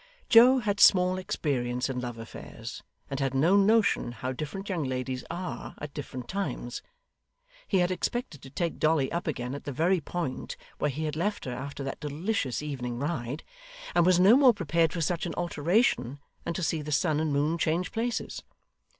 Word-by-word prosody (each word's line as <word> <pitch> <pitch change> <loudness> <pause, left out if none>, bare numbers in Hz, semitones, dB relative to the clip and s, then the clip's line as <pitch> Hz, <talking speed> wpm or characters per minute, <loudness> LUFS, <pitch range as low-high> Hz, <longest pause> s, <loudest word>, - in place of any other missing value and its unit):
Joe 250 +3 +8
had 210 -4 -1
small 185 -1 +6
experience 125 -8 -1
in 130 -2 -3
love 120 -2 -5
affairs, 115 0 -8 0.3
and 135 - -4
had 135 -1 -1
no 165 +8 +4
notion 200 - +3
how 125 +2 -4
different 155 +9 -5
young 180 -6 -1
ladies 130 -1 -3
are 175 +2 -5
at 145 -1 -7
different 130 -4 -6
times; 140 -10 -3 0.9
he 195 - +2
had 180 0 +2
expected 185 - -3
to 135 - -11
take 165 +5 -2
Dolly 155 -4 +2
up 170 +1 -3
again 125 -4 -3
at 145 - -7
the 145 - -3
very 170 +6 +2
point 155 -4 -4 0.2
where 150 - +1
he 145 +3 -4
had 150 -1 -2
left 205 +6 -1
her 125 - -3
after 140 +2 -6
that 135 - -5
delicious 150 - -2
evening 125 -5 -4
ride, 140 -1 -3 0.5
and 175 - +4
was 180 0 +4
no 195 +6 +7
more 260 -4 +6
prepared 165 -3 +1
for 170 - -3
such 170 +2 0
an 165 - -5
alteration 165 - +1 0.3
than 170 - -2
to 185 - -2
see 160 0 0
the 150 +1 -6
sun 155 0 +2
and 155 -1 0
moon 150 +4 +1
change 170 +3 0
places. 235 +1 -2
155 Hz, 185 wpm, -28 LUFS, 135-180 Hz, 0.9 s, Joe